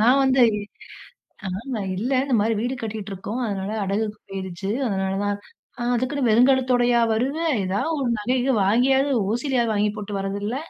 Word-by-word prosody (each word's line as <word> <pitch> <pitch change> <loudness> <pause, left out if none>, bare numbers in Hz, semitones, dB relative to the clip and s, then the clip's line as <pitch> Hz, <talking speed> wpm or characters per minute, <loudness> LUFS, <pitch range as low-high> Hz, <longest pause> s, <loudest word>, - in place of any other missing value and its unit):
நான் 245 +5 +5
வந்து, 265 -1 +4 1.0
ஆ - - -3 0.3
நா 215 - -2 0.2
இல்ல, 235 +7 -2
இந்த 270 -3 0
மாரி 225 +2 +1
வீடு 245 +4 -1
கட்டிகிட்டு 215 -2 -5
இருக்கோம். 210 +6 -5
அதனால 195 -1 -3
அடகுக்கு 210 +2 -2
போயிருச்சு. 190 0 -5 0.2
அதனால 190 -1 -1
தான் 205 0 0 0.4
அ. - - -1
"அதுக்குன்னு 255 +1 0
வெறுங்கழுத்தோடையா 245 0 +4
வருவ? 255 +7 0 0.3
ஏதாவது 200 +12 -1
ஒரு 260 - 0
நகை, 240 +5 0
கிகை 260 +2 +1
வாங்கியாவது, 265 +7 +3 0.2
ஓசியிலயாவது 240 -1 0
வாங்கி 210 0 +2
போட்டு 210 -1 -6
வரதில்ல?" 200 +4 -3
225 Hz, 155 wpm, -23 LUFS, 205-255 Hz, 1.0 s, நான்